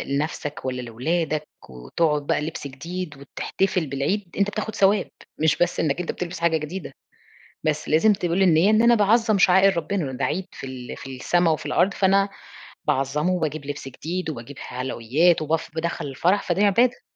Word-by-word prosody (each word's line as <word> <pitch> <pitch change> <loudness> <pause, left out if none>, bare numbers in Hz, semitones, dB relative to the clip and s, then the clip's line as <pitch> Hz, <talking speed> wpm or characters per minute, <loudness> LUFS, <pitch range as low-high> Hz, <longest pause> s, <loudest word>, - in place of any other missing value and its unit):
لنَفسك 150 -1 -3
والّا 125 -1 -2
لولادك 155 +6 -2 0.2
وتقعد 145 - -1
بقى - - +1
لبس 150 -1 -5
جديد 160 +3 -6
وتحتفل 180 +5 -2
بالعيد، 150 +9 -2
أنت 200 +1 +2
بتاخد 215 0 -4
ثواب، 200 +1 +3 0.3
مش 155 -1 +3
بس 175 0 +1
إنك 150 0 0
أنت 180 - -2
بتلبس 175 -2 -5
حاجة 170 -1 +2
جديدة، 155 0 -6 0.7
بس 155 -1 -1
لازم 185 +8 +5
تقول 180 -1 -1
النِية 175 +1 +5
إن 215 +1 +4
أنا 235 0 +6
باعظّم 220 +1 +3
شعائر 190 0 +5
ربنا، 175 +3 -1
إنه 135 - -3
ده - - 0
عيد 185 +4 -2
في - - -9
ال 130 -2 -7
في 135 -1 -8
السما 175 +5 +2
وفي 155 - -2
الأرض 195 +2 +2
فأنا 195 +1 +3 0.6
باعظّمه، 140 +6 +1
وباجيب 155 -5 -2
لبس 145 -1 -5
جديد 165 +6 -4
وباجيب 140 -1 -8
حلويات 130 +7 +1
وبف 160 +1 -1
بادخّل 165 -2 -2
الفرح، 175 +9 +1
فده 185 +3 +1
عبادة. 235 +5 +3
165 Hz, 170 wpm, -24 LUFS, 145-190 Hz, 0.7 s, أنا